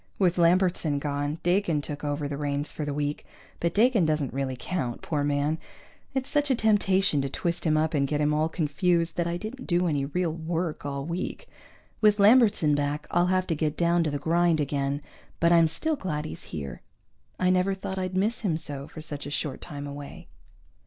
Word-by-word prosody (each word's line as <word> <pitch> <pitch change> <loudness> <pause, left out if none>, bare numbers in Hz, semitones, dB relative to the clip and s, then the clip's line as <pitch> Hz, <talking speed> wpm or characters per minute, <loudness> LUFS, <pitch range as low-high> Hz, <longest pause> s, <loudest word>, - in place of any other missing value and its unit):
With 180 -2 +2
Lambertson 175 -3 +3
gone, 145 +1 -2
Dakin 175 -3 +2
took 145 0 -6
over 145 0 -2
the 140 - -4
reins 145 0 -2
for 150 - -4
the 145 - -2
week, 145 0 -2 0.4
but 170 0 -1
Dakin 225 -2 +4
doesn't 155 -4 0
really 135 -1 -2
count, 130 -5 -3
poor 150 -3 -1
man. 145 +2 0 0.6
It's 265 0 -1
such 290 -1 +1
a 260 - +4
temptation 195 -8 +3
to 135 - -2
twist 170 +5 -2
him 155 0 +3
up 160 +1 +1
and 140 -2 +2
get 150 +1 -1
him 150 0 +2
all 155 +1 +1
confused 170 +2 0
that 170 -1 +1
I 170 0 -1
didn't 230 +7 -7
do 175 0 +2
any 145 -5 0
real 170 +3 -1
work 165 -2 -3
all 140 -1 -3
week. 170 +2 -4 0.5
With 210 -1 +5
Lambertson 205 -7 +5
back 145 +1 -1
I'll 175 +1 +3
have 185 0 +2
to 165 - -1
get 155 0 -1
down 170 0 +3
to 155 - 0
the 145 - -2
grind 170 +1 +2
again, 140 0 -1 0.4
but 170 0 +4
I'm 165 -1 +6
still 305 - -1
glad 155 - -3
he's - - -7
here. 70 -6 -6 0.6
I 185 0 +3
never 185 +1 +2
thought 190 0 -5
I'd 185 0 -2
miss 215 +5 +1
him 180 -8 0
so, 145 -3 -3
for 155 - -9
such 145 -2 -4
a - - -5
short 145 -1 -3
time 145 -1 -7
away. 145 0 -9
160 Hz, 205 wpm, -27 LUFS, 145-180 Hz, 0.6 s, I'm